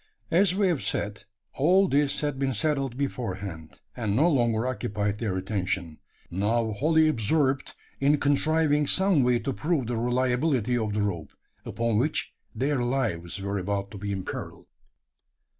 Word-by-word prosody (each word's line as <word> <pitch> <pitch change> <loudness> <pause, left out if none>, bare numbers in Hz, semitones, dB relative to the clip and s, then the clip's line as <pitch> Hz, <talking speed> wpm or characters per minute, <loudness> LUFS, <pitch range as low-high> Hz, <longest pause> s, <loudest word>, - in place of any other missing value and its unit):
As 185 +2 +4
we 200 0 +2
have 175 -7 +1
said, 100 0 -3 0.3
all 185 +7 +4
this 145 -2 +1
had 145 -3 -2
been 135 -2 0
settled 135 -1 -1
beforehand; 95 - -5
and 110 -4 -1
no 160 +8 +4
longer 120 -4 +1
occupied 105 -4 -2
their 100 -5 -1
attention 95 -4 -3 0.3
now 110 +5 0
wholly 155 +8 +3
absorbed 135 +1 +1 0.2
in 145 +2 +3
contriving 150 +1 +2
some 190 -4 +3
way 125 -1 +3
to 125 +4 -3
prove 150 -1 -1
the 120 0 -2
reliability 125 +1 +1
of 110 -3 -1
the 105 0 0
rope, 90 -6 -3 0.3
upon 115 -2 0
which 150 +6 -1 0.2
their 135 +3 0
lives 115 -9 -1
were 100 0 -2
about 100 +1 -3
to 100 - -8
be 100 0 -3
imperilled. 95 -2 -6
120 Hz, 150 wpm, -27 LUFS, 105-145 Hz, 0.3 s, As